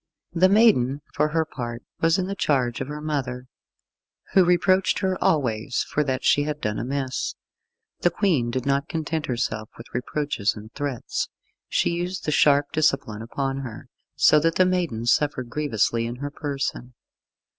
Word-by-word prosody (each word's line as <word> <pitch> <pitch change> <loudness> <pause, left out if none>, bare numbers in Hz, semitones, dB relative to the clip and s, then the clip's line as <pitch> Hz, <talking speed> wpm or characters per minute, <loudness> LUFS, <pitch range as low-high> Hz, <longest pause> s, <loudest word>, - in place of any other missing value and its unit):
The 180 +2 +4
maiden, 170 - +4
for 150 - +2
her 160 +1 0
part, 120 -5 -6 0.2
was 165 +2 +3
in 185 - 0
the 195 - -3
charge 130 -10 0
of 130 - -3
her 150 +1 -6
mother, 130 -5 -3 0.9
who 190 - +7
reproached 185 +2 +3
her 190 -1 0
always 125 -5 +1
for 150 - 0
that 130 -2 -2
she 145 - +4
had 150 0 -2
done 105 -5 -2
amiss. 130 +1 -2 0.6
The 175 - +3
Queen 165 - +1
did 125 +1 -2
not 140 +2 0
content 160 -1 -2
herself 110 -3 -2
with 115 - -12
reproaches 125 -4 -1
and 110 +2 -11
threats. 145 -5 -3 0.4
She - - +1
used 175 +2 -3
the 150 - 0
sharp 145 -1 +4
discipline 135 -8 +1
upon 135 +3 -3
her, 125 -5 -7 0.3
so 150 - +6
that 165 +2 +1
the 185 - +5
maiden 175 -11 -1
suffered 130 -1 +1
grievously 115 -5 0
in 120 - -5
her 145 +3 -5
person. 140 -4 -4
140 Hz, 165 wpm, -24 LUFS, 125-160 Hz, 0.9 s, who